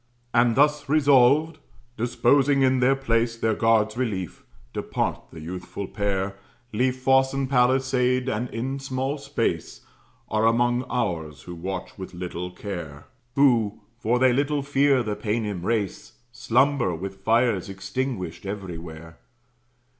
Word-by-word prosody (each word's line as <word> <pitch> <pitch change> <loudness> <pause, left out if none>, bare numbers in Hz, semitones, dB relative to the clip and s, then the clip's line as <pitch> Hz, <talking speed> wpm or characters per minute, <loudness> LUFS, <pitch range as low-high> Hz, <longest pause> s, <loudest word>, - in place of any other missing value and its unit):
And 120 0 +4
thus 145 0 +2
resolved, 145 +2 +4 0.4
disposing 135 +4 +2
in 130 0 +3
their 130 +2 +4
place 115 -3 0
Their 110 -1 +1
guard's 110 -1 +2
relief, 105 -9 -3 0.3
depart - - -2
the 80 - -10
youthful 90 +4 -6
pair, 95 -1 -2 0.4
Leave 125 +4 +1
fosse 135 +1 +3
and 135 -1 -1
palisade, 130 0 +2
and 120 0 -2
in 130 +4 -3
small 135 +2 -3
space - - -2 0.5
Are 110 +1 +2
among 120 +2 +2
ours, 80 - -2
who 90 - -8
watch 95 +3 -6
with 95 -1 -8
little 90 0 -5
care; 85 -6 -7 0.3
Who, 120 -7 +3 0.2
for 120 +1 +1
they 130 0 +4
little 140 +2 0
fear 140 -2 +3
the 105 -2 -2
Paynim 105 -4 -2
race, 100 0 -2 0.2
Slumber 120 -4 +1
with 95 +3 -7
fires 115 -4 +2
extinguished 95 -1 -4
everywhere. 85 -5 -7
120 Hz, 130 wpm, -25 LUFS, 95-130 Hz, 0.5 s, And